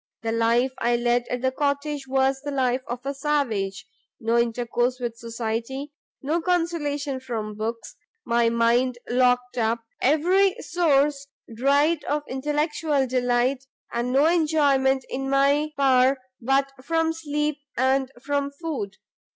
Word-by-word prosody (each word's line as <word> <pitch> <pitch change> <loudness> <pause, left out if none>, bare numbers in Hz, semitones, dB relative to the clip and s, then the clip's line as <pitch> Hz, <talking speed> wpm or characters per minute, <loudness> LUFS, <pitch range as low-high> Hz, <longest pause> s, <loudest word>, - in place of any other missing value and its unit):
the 225 - -1
life 230 +3 +2
I 240 +1 +2
led 240 0 +1
at 250 -1 -3
the 260 - +2
cottage 285 0 -2
was 265 0 +1
the 290 - -5
life 260 -2 0
of 245 +2 -5
a 275 - -1
savage; 230 -9 -1 0.3
no 230 +1 0
intercourse 240 +1 0
with 240 -2 -3
society, 230 +4 -4 0.3
no 315 +5 0
consolation 310 -6 -1
from 225 -5 -4
books; 225 +2 -5 0.3
my 235 0 +2
mind 235 +2 +2
locked 250 0 +2
up, 230 +1 0 0.2
every 360 +7 +3
source 290 -4 +1 0.3
dried 285 +6 +2
of 295 +1 -1
intellectual 295 +1 0
delight, 250 +1 +1 0.3
and 240 +1 -1
no 275 +3 +4
enjoyment 285 -5 +2
in 270 +1 -4
my 280 +2 +3
power 265 -1 +4 0.2
but 270 +3 +1
from 325 +2 +1
sleep 300 -2 -2 0.2
and 265 +1 +2
from 285 0 -1
food. 290 - -4
265 Hz, 135 wpm, -24 LUFS, 240-290 Hz, 0.3 s, no